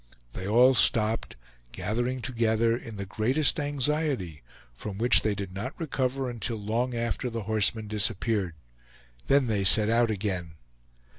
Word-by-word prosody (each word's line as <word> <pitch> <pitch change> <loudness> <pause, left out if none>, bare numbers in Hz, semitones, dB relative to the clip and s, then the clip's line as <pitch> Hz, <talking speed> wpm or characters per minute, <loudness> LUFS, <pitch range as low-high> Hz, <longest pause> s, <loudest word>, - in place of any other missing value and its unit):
They 95 +1 -6
all 125 +5 +5
stopped, 115 -3 +2 0.4
gathering 120 +4 -3
together 115 -2 +1
in 115 -2 -8
the 100 - -4
greatest 130 +11 +1
anxiety, 145 - -2 0.3
from 95 - -7
which 120 +3 +5
they 110 -2 0
did 95 -2 -6
not 110 +8 -6
recover 135 -4 -2
until 120 -1 -3
long 115 +4 -2
after 120 +2 -2
the 115 -2 -5
horseman 110 +1 +1
disappeared; 105 -3 -1 0.7
then 140 -1 +4
they 105 -4 0
set 105 +2 +5
out 115 0 +3
again. 95 -5 -3
115 Hz, 140 wpm, -27 LUFS, 105-125 Hz, 0.7 s, all